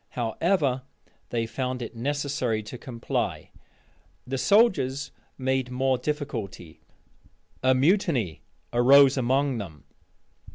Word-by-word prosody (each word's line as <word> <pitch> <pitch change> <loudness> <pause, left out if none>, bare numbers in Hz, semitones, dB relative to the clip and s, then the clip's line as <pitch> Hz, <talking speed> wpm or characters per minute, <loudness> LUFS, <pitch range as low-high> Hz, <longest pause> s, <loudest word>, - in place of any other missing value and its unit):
However, 130 - +1 0.5
they 115 -1 -1
found 125 +1 -3
it 115 - -8
necessary 135 -3 -1
to 105 +4 -8
comply. 120 -3 -3 0.7
The 130 +1 -3
soldiers 145 - +3 0.3
made 130 -1 0
more 130 0 0
difficulty. 115 - -5 0.8
A 130 0 +4
mutiny 140 - +1 0.3
arose 135 +3 +6
among 130 0 +1
them. 80 -8 -8
130 Hz, 95 wpm, -26 LUFS, 120-140 Hz, 0.8 s, arose